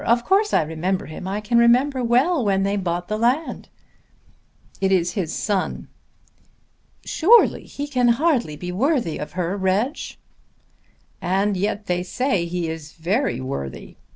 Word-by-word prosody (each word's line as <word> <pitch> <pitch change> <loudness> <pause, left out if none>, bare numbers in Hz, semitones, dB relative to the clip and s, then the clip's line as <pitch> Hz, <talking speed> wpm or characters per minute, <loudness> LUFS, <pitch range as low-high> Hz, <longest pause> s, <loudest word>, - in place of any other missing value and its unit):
Of 235 +1 +2
course 410 +2 +2
I - - +3
remember 175 +5 -2
him. 155 +4 -8
I 200 +2 -2
can 235 +3 +2
remember 250 +3 +3
well 255 +6 +2
when 195 -2 +1
they 200 +1 0
bought 175 -3 -2
the 215 +1 -2
land." 255 +8 0 1.1
"It 190 0 +2
is 175 -2 +2
his 180 -7 -2
son." 200 -3 -2 1.2
"Surely 445 +8 +4
he 285 +1 -6
can 250 -4 +1
hardly 240 - +2
be 180 +4 -6
worthy 240 - 0
of 150 - -6
her, 180 +1 -2
Reg." 200 +7 0 1.3
"And 195 +3 +1
yet 205 +2 -2
they 180 -1 -1
say 190 0 -1
he 170 0 -3
is 160 -1 -7
very 195 - -1
worthy. 130 - -6
200 Hz, 150 wpm, -22 LUFS, 180-250 Hz, 1.3 s, Surely